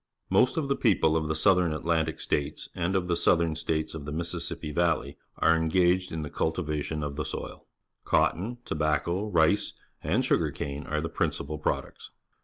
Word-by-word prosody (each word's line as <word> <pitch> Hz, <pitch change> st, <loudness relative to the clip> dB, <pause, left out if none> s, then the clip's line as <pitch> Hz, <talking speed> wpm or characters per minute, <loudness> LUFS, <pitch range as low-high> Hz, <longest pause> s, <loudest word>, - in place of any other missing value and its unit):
Most 130 Hz, -, +4 dB
of 155 Hz, -3 st, 0 dB
the 140 Hz, -, +1 dB
people 90 Hz, -11 st, +3 dB
of 80 Hz, -1 st, 0 dB
the 80 Hz, -, -1 dB
South 90 Hz, +4 st, +4 dB
Atlantic 80 Hz, -1 st, 0 dB
States 70 Hz, -1 st, -2 dB
and 90 Hz, +3 st, -1 dB
of 90 Hz, -2 st, 0 dB
the 85 Hz, -, +1 dB
Southern 85 Hz, -1 st, +2 dB
States 80 Hz, -1 st, -2 dB
of 80 Hz, -3 st, -7 dB
the 75 Hz, -, -5 dB
Mis 85 Hz, +2 st, -2 dB
sissippi 85 Hz, -3 st, -4 dB
Valley 85 Hz, 0 st, +1 dB, 0.2 s
are 80 Hz, +1 st, +4 dB
engaged 90 Hz, +3 st, +2 dB
in 80 Hz, -1 st, -3 dB
the 75 Hz, -, -5 dB
cultivation 75 Hz, -2 st, -2 dB
of 70 Hz, 0 st, -4 dB
the 75 Hz, -, -1 dB
soU. -, -, -6 dB, 0.4 s
Cotton, 110 Hz, +8 st, +1 dB
tobacco, 80 Hz, +6 st, 0 dB
rice, 90 Hz, +3 st, +2 dB, 0.3 s
and -, -, +1 dB
sugar -, -, +2 dB
cane_are 75 Hz, +2 st, -3 dB
the -, -, -1 dB
principal 75 Hz, -1 st, -2 dB
products. -, -, -3 dB
80 Hz, 175 wpm, -28 LUFS, 75-90 Hz, 0.4 s, Most